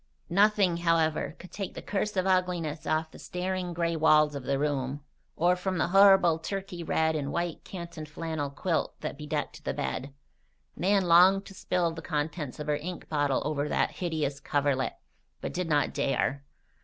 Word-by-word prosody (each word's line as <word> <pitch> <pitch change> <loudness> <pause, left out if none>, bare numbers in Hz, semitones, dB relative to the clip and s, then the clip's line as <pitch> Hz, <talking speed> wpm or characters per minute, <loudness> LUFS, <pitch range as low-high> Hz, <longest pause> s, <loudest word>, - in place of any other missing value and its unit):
Nothing, 200 -2 +4
however, 165 -3 +1
could 185 - -12
take 195 -2 -5
the - - -6
curse 205 0 -2
of 185 - +2
ugliness 180 -4 0
off 160 0 0
the - - -13
staring 180 0 -3
gray 170 0 -1
walls 155 -1 +4
of 140 -3 -6
the 140 0 +1
room, 140 -1 -1 0.3
or 175 +2 +3
from 185 +1 -2
the 170 - +1
horrible 195 -4 +6
turkey 190 +1 -5
red 160 0 +1
and 145 -2 -2
white 170 -1 -2
canton 170 -4 -7
flannel 155 -1 -3
quilt 160 +4 -2
that 155 - -4
bedecked 150 +1 -4
the - - -2
bed. 140 +2 -3 0.6
Nan 195 +2 +2
longed 185 +3 +6
to - - -11
spill 180 -2 0
the 165 0 -7
contents 150 -3 -3
of 150 - -4
her 150 0 +1
ink 175 +4 -7
bottle 145 -3 +1
over 150 -1 -1
that - - +1
hideous 155 -6 -2
coverlet, 140 -2 0 0.4
but - - -5
did 180 -2 -2
not 145 -1 +2
dare. 140 0 0
165 Hz, 175 wpm, -28 LUFS, 150-180 Hz, 0.6 s, horrible